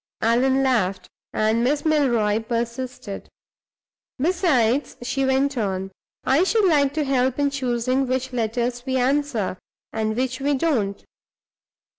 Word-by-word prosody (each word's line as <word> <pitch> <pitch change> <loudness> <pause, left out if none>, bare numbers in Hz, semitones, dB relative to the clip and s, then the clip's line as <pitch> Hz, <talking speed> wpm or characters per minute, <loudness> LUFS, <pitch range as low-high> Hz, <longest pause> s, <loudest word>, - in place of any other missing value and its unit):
Allan 260 +4 +3
laughed, 210 -8 0 0.2
and 220 +2 +1
Miss 290 +5 0
Milroy 240 -9 +2
persisted. 235 -2 -4 0.9
"Besides," 290 - +1
she 270 +2 -1
went 265 0 +1
on, 190 -2 -2 0.3
"I 275 +6 +3
should 430 +2 +2
like 285 -4 +3
to 310 - +1
help 260 -2 +1
in 285 -1 +1
choosing 255 0 0
which 260 0 -2
letters 240 +1 -1
we 260 0 -1
answer, 255 -7 0 0.3
and 220 0 -1
which 255 +1 -1
we 285 +1 +1
don't. 245 -10 -1
255 Hz, 125 wpm, -23 LUFS, 230-280 Hz, 0.9 s, Allan